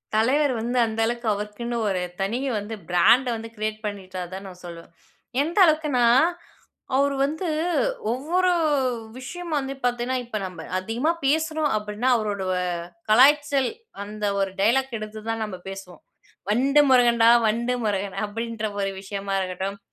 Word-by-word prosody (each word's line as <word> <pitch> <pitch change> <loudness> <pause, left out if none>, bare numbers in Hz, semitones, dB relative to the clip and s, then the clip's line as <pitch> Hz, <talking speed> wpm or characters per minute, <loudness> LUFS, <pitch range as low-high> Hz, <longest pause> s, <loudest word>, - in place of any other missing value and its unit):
தலைவர் 270 +6 +3
வந்து 240 +2 -2
அந்த 220 0 -4
அளவுக்கு 235 0 -3
அவருக்குன்னு 210 +4 -4
ஒரு 190 -2 0 0.2
தனி 200 +5 0 0.2
வந்து 210 +2 -6
பிராண்ட் 235 +9 +5
வந்து 225 0 -7
கிரியேட் 215 0 -3
பண்ணிட்டாருன்னு 185 -3 -6
தான் 195 +1 -8
நான் 180 -1 -12
சொல்லுவேன். 170 -1 -10 0.5
எந்த 325 +6 -3
அளவுக்குனா 305 -6 +2 0.9
அவரு 280 +1 +2
வந்து 315 +6 -2 0.6
ஒவ்வொரு 345 +9 +1 0.7
விஷயம் 330 +6 -7
வந்து, 270 -1 -4
பார்த்தீங்கன்னா 245 +1 0
இப்ப 235 -2 -6
நம்ம 175 -3 -9
அதிகமா 230 - 0
பேசுறோம் 315 +1 +1
அப்டின்னா 210 +3 -2
அவரோட 205 -3 -2 0.7
கலாய்ச்சல் 275 +2 +5 0.3
அந்த 210 +1 -6 0.2
ஒரு 195 0 0
டயலாக் 245 +4 +2
எடுத்து 215 0 -7
தான் 225 0 -2
நம்ம 210 -3 -6
பேசுவோம். 195 -3 -9 0.5
"வண்டு 270 +7 +4
முருகன் 240 -2 +5
டா, 230 - +8 0.2
வண்டு 235 +3 0
முருகன்" 200 -2 -2
அப்டின்ற 225 +1 -4
ஒரு 195 0 0
விஷயமா 195 0 -4
இருக்கட்டும். 190 +2 -4
225 Hz, 140 wpm, -24 LUFS, 200-265 Hz, 0.9 s, டா